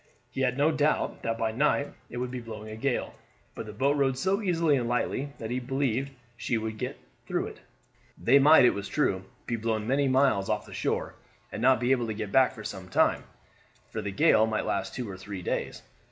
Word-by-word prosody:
He 135 - -3
had 125 -1 +1
no 145 +3 +4
doubt 150 0 0
that 115 0 -2
by 110 -1 0
night 140 +3 +1 0.2
it 120 - -7
would 125 0 -3
be 125 - -4
blowing 110 -2 -8
a - - -6
gale; 130 +3 -1 0.4
but 110 - -7
the - - -6
boat 135 +7 +1
rode 135 -2 +1
so 190 +8 +1
easily 165 -6 +2
and 120 -3 -1
lightly 135 +3 -1
that 110 +1 -6
he 125 - 0
believed 135 0 -1 0.3
she 120 0 -1
would 110 -1 -4
get - - -4 0.3
through - - -1
it. - - -9 0.6
They 135 +4 +5
might, 150 -1 +7
it - - +5
was 100 0 -5
true, 95 -10 0 0.2
be 120 - -2
blown 110 -1 -1
many 135 +4 +2
miles 130 -7 +3
off - - -1
the - - -12
shore, - - -2 0.4
and - - -5
not 130 -1 +5
be 125 +2 +1
able 120 -3 +2
to 110 - -3
get 105 -2 -5
back 130 -1 +4
for 110 - -9
some 95 -3 -7
time, - - +2 0.7
for - - -3
the 100 - -3
gale 110 +1 +4
might 110 -1 -1
last - - -2
two 125 -2 -4
or 95 -2 -7
three 95 -1 -7
days. - - -3
125 Hz, 225 wpm, -28 LUFS, 110-140 Hz, 0.7 s, might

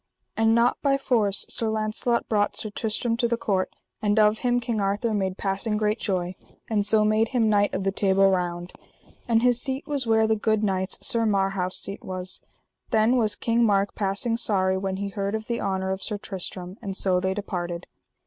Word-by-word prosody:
And 225 0 +3
not 235 +1 +2
by 275 -1 +2
force 225 -7 +1
Sir 225 - +1
Launcelot 220 +2 0
brought 205 -2 +1
Sir 215 - -2
Tristram 225 +2 -1
to 235 -1 +1
the 235 0 0
court, 195 -5 -1 0.3
and 210 0 +1
of 215 0 +4
him 245 -1 +1
King 230 -3 -2
Arthur 205 +3 0
made 190 -2 -1
passing 200 +2 -1
great 215 +1 0
joy, 180 -3 -2 0.3
and 210 -2 +1
so 215 +1 +5
made 215 +1 +2
him 230 -3 +1
Knight 205 -1 +2
of 190 - -2
the 195 - +1
Table 195 0 +3
Round; 175 -2 -1 0.5
and 230 -1 +2
his 245 -1 +3
seat 265 +1 -2
was 280 -5 -1
where 220 0 +4
the 220 0 +2
good 215 0 0
knight's, 190 -2 -1
Sir 230 -3 +2
Marhaus, 195 -2 0
seat 200 +1 -4
was. 185 0 -5 0.5
Then 220 +3 +3
was 215 -4 +2
King 235 0 +1
Mark 200 -2 +2
passing 205 +3 -1
sorry 190 -5 +1
when 190 0 -2
he 200 0 -3
heard 200 +1 -3
of 220 0 -4
the 235 0 -3
honour 190 -1 -1
of 190 0 -3
Sir 210 - -3
Tristram; 185 -2 -6
and 195 -3 -5
so 185 -2 +1
they 190 +1 -1
departed. 175 -4 -4
210 Hz, 200 wpm, -25 LUFS, 195-225 Hz, 0.5 s, so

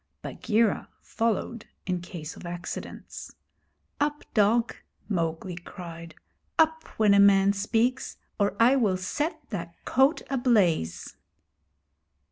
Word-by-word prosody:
Bagheera 220 -1 0
followed 230 0 -2 0.2
in 180 -1 -1
case 170 -3 -8
of - - -12
accidents. 175 +1 -7 0.6
'Up, 295 0 0
dog!' 225 +2 +3 0.3
Mowgli 170 -2 -2
cried. 170 -2 -9 0.4
'Up, 320 0 +3
when 210 -2 +5
a 200 - +6
man 200 0 +6
speaks, 230 +5 0 0.2
or 200 -1 +1
I 240 +4 +6
will 205 -7 +2
set 300 - -2
that 170 -4 -5
coat 270 +5 +3
ablaze!' 200 - +1
200 Hz, 105 wpm, -27 LUFS, 175-240 Hz, 0.6 s, a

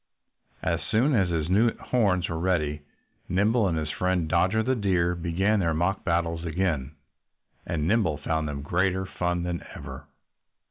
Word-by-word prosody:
As - - 0
soon 130 +7 +3
as 95 -7 +3
his 80 -3 -1
new 110 +6 +3
horns 100 -8 +1
were 80 -1 -3
ready 75 -5 0 0.5
Nimble 105 +4 +2
and 85 -3 0
his 75 -1 -2
friend 90 -3 0
Dodger 95 +7 +2
the 130 +3 +1
Deer 90 -6 +1
began 90 +5 +1
their 85 -4 +1
mock 90 +4 0
battles 85 -1 0
again. 80 -5 -1 0.7
And 80 -2 -1
Nimble 95 -7 +2
found 80 +1 -1
them 70 -1 -5
greater 95 +4 0
fun 90 -1 -2
than 90 -1 -3
ever. 70 +1 -9
90 Hz, 155 wpm, -26 LUFS, 80-95 Hz, 0.7 s, soon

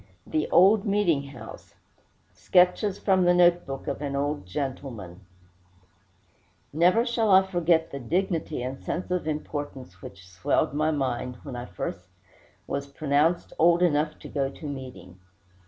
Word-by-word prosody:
THE 155 -1 -1
OLD 195 +3 +5
MEETING 185 -9 +1
HOUSE 120 -5 -12 0.6
SKETCH 185 +2 +2
FROM 190 -2 +3
THE 175 0 +4
NOTE 175 -1 +4
BOOK 135 0 -6
OF - - -4
AN 140 -1 -3
OLD 145 -8 -2
GENTLEMAN 120 -7 -5 1.5
Never 180 +9 +4
shall 235 -3 0
I 190 0 +7
forget 170 -3 +1
the 140 - -5
dignity 160 0 -2
and 130 +1 -5
sense 180 +1 -4
of 180 -3 -1
importance 145 - -5
which 95 -2 -11
swelled 90 +7 0
my 155 +2 +1
mind 125 -4 -2
when 140 -4 -7
I 120 +1 -6
was - - -3 0.9
first 140 - -24
pronounced 155 +4 +1
old 170 +2 +5
enough 155 -2 +1
to - - -11
go 135 -2 -1
to 145 - -11
meeting. 130 -10 -8
150 Hz, 145 wpm, -26 LUFS, 135-175 Hz, 1.5 s, I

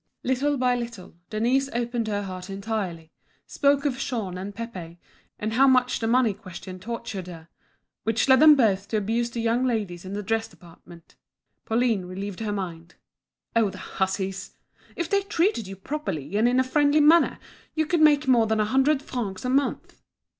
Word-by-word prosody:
Little 275 +3 +1
by 250 -1 +2
little, 235 -6 -6 0.2
Denise 250 +5 +1
opened 235 -1 -2
her 205 -1 -1
heart 185 -1 -7
entirely, 195 -5 -4 0.3
spoke 280 0 +1
of 265 -3 -1
Jean 220 -9 -3
and 195 +2 -6
Pépé, 185 -7 -7 0.4
and 215 +1 -3
how 270 +4 +5
much 255 -1 +3
the 225 - -1
money 235 -2 +3
question 185 0 -10
tortured 220 -3 -6
her; 165 -2 -11 0.5
which 225 +3 0
led 260 -1 +6
them 305 0 +9
both 205 -7 +2
to 220 - -1
abuse 225 +3 0
the 235 0 -4
young 230 +2 +1
ladies 210 -9 -2
in 190 +1 -7
the 205 +1 -3
dress 225 +2 -1
department. 170 0 -17 0.5
Pauline 225 -4 +1
relieved 190 +1 -6
her 220 -2 -2
mind. 170 -4 -6 0.6
"Oh, 225 -3 +3
the - - -10
hussies! 190 0 -3 0.4
If 340 - -2
they 400 +3 +2
treated 385 - 0
you 195 - -7
properly 195 - -5
and 225 +3 +4
in 250 +1 +2
a - - +4
friendly 290 +3 +3
manner, 315 +3 +5 0.4
you 315 0 +1
could 340 0 +1
make 300 -2 +5
more 235 -4 +4
than 220 0 +1
a 215 - +3
hundred 270 +5 +2
francs 215 -5 -4
a 250 - 0
month." 275 +1 -1
225 Hz, 180 wpm, -25 LUFS, 195-260 Hz, 0.6 s, them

